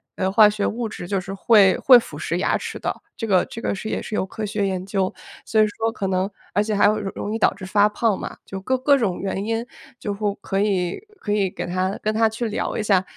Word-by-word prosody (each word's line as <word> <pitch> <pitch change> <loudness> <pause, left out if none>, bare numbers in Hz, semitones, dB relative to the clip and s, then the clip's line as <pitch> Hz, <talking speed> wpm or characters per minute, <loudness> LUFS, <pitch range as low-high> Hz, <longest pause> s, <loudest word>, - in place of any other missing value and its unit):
呃， 190 0 0
化 210 0 +7
学 210 -1 -2
物 230 +1 -2
质 175 -4 -7
就 195 +1 0
是 195 +1 -7
会 195 -1 +5
会 255 -2 +8
腐 235 - -4
蚀 - - -2
牙 - - +1
齿 - - -6
的， - - -2 0.2
这 225 - -4
个 190 -4 +3
这 230 - -8
个 - - -1
是 200 +3 -6
也 - - -2
是 215 - -5
有 - - 0
科 215 +3 -5
学 205 -1 -1
研 185 -1 -3
究， 195 -1 0 0.3
所 220 -1 +3
以 - - +6
说， 225 +2 -2
可 195 - -3
能 190 +1 0 0.2
而 205 - +3
且 210 0 -1
还 200 - +4
有 215 +1 +3
容 205 +1 -4
易 225 - -2
导 - - +4
致 195 -1 -9
发 205 +2 +4
胖 215 -1 0
嘛。 - - -6
就 195 - -6
各 260 +7 0
各 280 +2 +4
种 205 -8 -1
原 195 0 -2
因 225 +1 -1 0.3
就 205 - -3
会 205 0 -2
可 195 - -2
以 185 -4 0 0.2
可 205 - -4
以 200 -3 +2
给 - - -5
他 185 +2 -1
跟 215 - +1
他 225 +1 +3
去 230 +2 -3
聊 210 - -2
一 215 - -1
下， 195 -3 +3
205 Hz, 285 characters per minute, -22 LUFS, 190-220 Hz, 0.3 s, 会